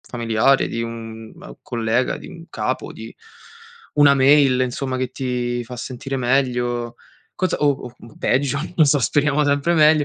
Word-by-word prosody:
familiare, 120 +3 +1
di 115 - -3
un, 115 -1 -8
uhm, - - -12
collega, 115 +2 -1
di - - -11
un 165 0 -12
capo, 105 - -3
di 115 +1 -10 0.8
una 145 -1 +6
mail, 135 -1 +4
insomma, 130 +1 -2
che 130 0 -2
ti 125 -2 -2
fa 125 +2 -9
sentire 130 +2 -5
meglio, 120 -2 0 0.4
cosa 185 -2 -1
o 145 - +3
o, 125 -3 -5
mhmm, 115 - -15
peggio, 140 +1 +1 0.2
non 155 - +5
so, 145 +1 +3
speriamo 145 +3 +1
sempre 145 +4 +1
meglio, 155 -1 +5
130 Hz, 160 wpm, -21 LUFS, 120-140 Hz, 0.8 s, una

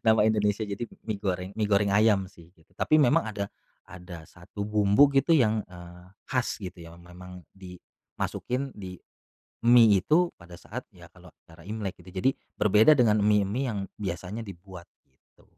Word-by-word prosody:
nama 110 -1 +5
Indonesia 105 -1 +1
jadi 100 +4 -4 0.2
mie 105 -3 -3
goreng 95 -2 -3
mie 105 - +1
goreng 100 0 +3
ayam 100 -2 +3
sih 85 -2 -18
gitu. 80 0 -28
Tapi 155 - +2
memang 120 -4 +3
ada 100 -2 -4 0.4
ada 90 -2 -11
1 95 +3 -9
bumbu 105 +6 +4
gitu 160 +5 +3
yang, 110 -6 +2
eee, 90 -1 -13 0.3
khas 125 -3 -1
gitu 90 -1 -8
ya 85 - -13
memang 90 +1 -13
dimasukin 95 +7 -6
di 95 -3 -9 0.7
mie 115 -4 +6
itu 170 - +2
pada 85 0 -12
saat 120 +7 -9
ya 85 -4 -16
kalau 90 0 -17 0.2
acara 85 0 -17
Imlek 105 -4 -5
gitu, 90 +1 -14
jadi 130 - +3 0.3
berbeda 105 +8 +5
dengan 110 -4 +3
mie-mie 105 +4 +1
yang 105 - -3 0.2
biasanya 95 +3 -5
dibuat, 95 -3 -11 0.2
gitu. 65 - -31
100 Hz, 160 wpm, -27 LUFS, 90-110 Hz, 0.7 s, mie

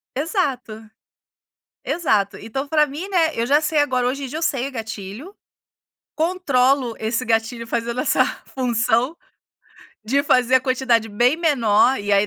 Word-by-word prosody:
Exato. 260 - -3 1.0
Exato. 205 - 0
Então 265 +6 -5
pra 300 0 +3
mim, 300 +7 -7
né, 335 -5 +1
eu 230 - 0
já 290 +3 +4
sei 310 0 0
agora. 255 -4 +1
Hoje 275 +2 -2
em - - -5
dia, 305 - -5
eu 330 - -6
sei 270 -4 0
o - - -12
gatilho, 220 - -7 0.8
controlo 280 -7 +1
esse 230 +3 -2
gatilho 230 +1 -1
fazendo 235 +2 -2
essa - - +2 0.3
função, 245 +2 0 0.9
de 265 +6 +2
fazer 255 -1 +4
a 260 - +2
quantidade 255 -4 +1
bem 240 +7 +2
menor. 260 -7 +2
E 205 0 -2
aí, 200 +1 +4
255 Hz, 150 wpm, -21 LUFS, 225-290 Hz, 1.0 s, já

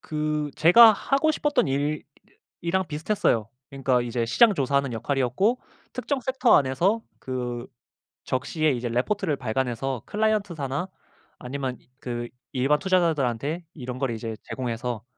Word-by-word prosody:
그 150 -1 -2
제가 220 +7 +8
하고 275 +8 +1
싶었던 295 -1 +1 1.0
일이랑 185 +2 0
비슷했어요. 150 - 0 0.2
그러니까 135 -2 +1
이제 120 -1 -1
시장 210 - +5
조사하는 140 -2 0
역할이었고 135 - 0 0.3
특정 280 -3 -2
섹터 260 0 +3
안에서 170 - +2 0.2
그 125 -2 -4 0.6
적시에 140 +4 0
이제 120 -1 -2
레포트를 155 - 0
발간해서 125 0 -2
클라이언트사나 190 -8 -1 0.5
아니면 130 0 -4
이 - - -30
그 120 -2 -4 0.3
일반 135 +3 +2
투자자들한테 160 - 0
이런 125 -4 -6
거를 130 -2 -1
이제 110 0 -5
제공해서 120 -2 -4
140 Hz, 330 characters per minute, -25 LUFS, 125-180 Hz, 1.0 s, 제가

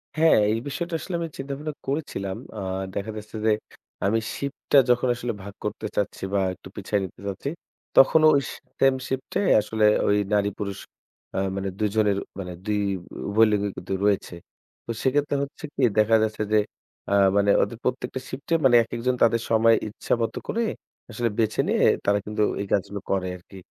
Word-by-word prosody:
হ্যাঁ, 160 -3 +5
এই 110 - +1
বিষয়টা 170 +5 -3
আসলে 185 - -5
আমি 165 - -2
চিন্তা-ভাবনা 140 +3 -5
করেছিলাম। 135 -10 -3 0.2
আ - - -4 0.3
দেখা 100 +2 -3
যাচ্ছে 110 +1 -9
যে 110 - +5 0.5
আমি 110 +3 +2 0.2
শিফটটা 140 0 0
যখন 125 +1 +3
আসলে 120 -1 -3
ভাগ 100 0 -8
করতে 105 +1 -4
চাচ্ছি 100 - -2
বা 100 - +3
একটু 90 - -13
পিছায় 100 +1 -1
নিতে 95 - -8
চাচ্ছি, 100 +8 -3 0.5
তখনও 155 +4 +7
ওই 140 - +3
সে - - -8 0.2
সেম 135 -1 +5
শিফটটায় 135 +9 -1
আসলে 105 0 0 0.2
ওই 100 - +4 0.2
নারী-পুরুষ 100 -1 -1 0.6
আ - - +2 0.2
মানে 100 0 -2
২ 105 -1 +2
জনের 105 -2 +3 0.5
২ 105 -1 +1 0.5
উভয় 110 +2 +5
লিঙ্গই 100 -1 0
কিন্তু 95 +2 -5
রয়েছে। 100 -3 +1 0.5
তো - - -4
সেক্ষেত্রে 145 +2 +1
হচ্ছে 140 - -9
কী, 135 - 0 0.2
দেখা 110 +1 +5
যাচ্ছে 110 0 -1
যে 110 - +6 0.5
আ - - +3 0.2
মানে 100 0 +4
ওদের 115 - -4
প্রত্যেকটা 125 +1 -2
শিফটে 140 +5 -4
মানে 125 -2 +6
একেকজন 120 +2 -1
তাদের 115 0 +3
সময় 115 0 +5
ইচ্ছামতো 115 +1 -2
করে 235 - 0 0.5
আসলে 120 +1 0
বেছে 110 -1 +1
নিয়ে - - +3 0.2
তারা 100 0 +3
কিন্তু 105 0 0 0.2
এই 100 - -4
কাজগুলো 100 +1 -1
করে 95 -1 0
আরকি। 95 +2 -15
110 Hz, 170 wpm, -25 LUFS, 100-135 Hz, 0.6 s, তখনও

